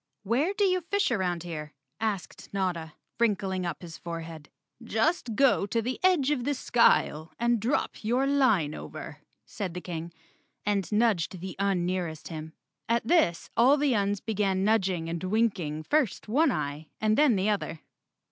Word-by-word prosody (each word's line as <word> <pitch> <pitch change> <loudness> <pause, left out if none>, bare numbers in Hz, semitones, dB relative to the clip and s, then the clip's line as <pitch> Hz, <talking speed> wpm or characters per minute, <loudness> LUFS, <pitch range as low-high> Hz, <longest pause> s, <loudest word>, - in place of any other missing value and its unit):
"Where 250 - +1
do 410 - +1
you 370 -2 +3
fish 400 0 0
around 180 -6 0
here?" 150 -4 -6 0.2
asked 210 -4 -3
Notta, 175 -5 -2 0.3
wrinkling 195 -5 +1
up 170 +1 -5
his 165 -2 -9
forehead. 165 -2 -7 0.3
"Just 235 +1 0
go 260 -5 +3
to 230 - 0
the 250 +3 -3
edge 340 -7 +4
of 265 -5 0
the 285 +2 0
skyle 165 - +2
and 235 0 +2
drop 230 +2 -1
your 245 +5 +2
line 255 - +3
over," - - -8 0.3
said 185 -5 -5
the - - -2
King, 170 -1 -5 0.5
and 200 -4 0
nudged 210 -5 +1
the 185 +1 -6
Un 195 -3 +1
nearest 175 -4 -3
him. 160 -1 -7 0.4
At 230 -1 +1
this 280 - +2
all 260 +5 +5
the 285 -2 +2
Uns 205 -2 0
began 195 -3 0
nudging 190 -6 +1
and 165 +1 -4
winking 185 -7 0
first 265 - 0
one 280 +7 +3
eye 150 -1 -3
and 215 0 +2
then 290 -4 +5
the 195 +2 +1
other. 195 -6 -2
200 Hz, 165 wpm, -28 LUFS, 170-240 Hz, 0.5 s, all